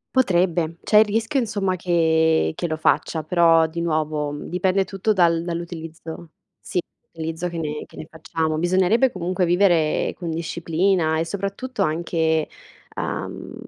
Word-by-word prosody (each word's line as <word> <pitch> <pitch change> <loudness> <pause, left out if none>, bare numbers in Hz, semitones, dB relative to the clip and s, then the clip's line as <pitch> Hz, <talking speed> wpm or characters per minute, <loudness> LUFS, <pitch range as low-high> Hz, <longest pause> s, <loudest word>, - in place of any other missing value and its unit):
Potrebbe. 175 -7 +2
C'è 210 - +5
il 220 - +6
rischio, 225 +6 0
insomma, 200 -5 -1
che 160 - +2
che 175 - -2
lo 155 -1 -2
faccia. 160 0 +1
Però, 165 -1 +4
di 170 +1 -5
nuovo, 155 -3 -1
dipende 185 +2 0
tutto 195 +3 0
dal 170 -3 +3
dall'utilizzo 165 -1 -7 0.3
sì, 180 - -3 0.3
l'utilizzo 165 +2 -4
che 170 - -6
ne 150 -2 -3
che - - -18
ne 155 - -8
facciamo. 160 0 -2
Bisognerebbe 185 +9 +3
comunque 180 0 -1
vivere 175 -3 +2
con 170 -2 -5
disciplina 165 0 0
e 165 - 0
soprattutto 200 +8 -4
anche, 160 0 0 0.5
uhm, - - -5
170 Hz, 140 wpm, -22 LUFS, 160-185 Hz, 0.5 s, il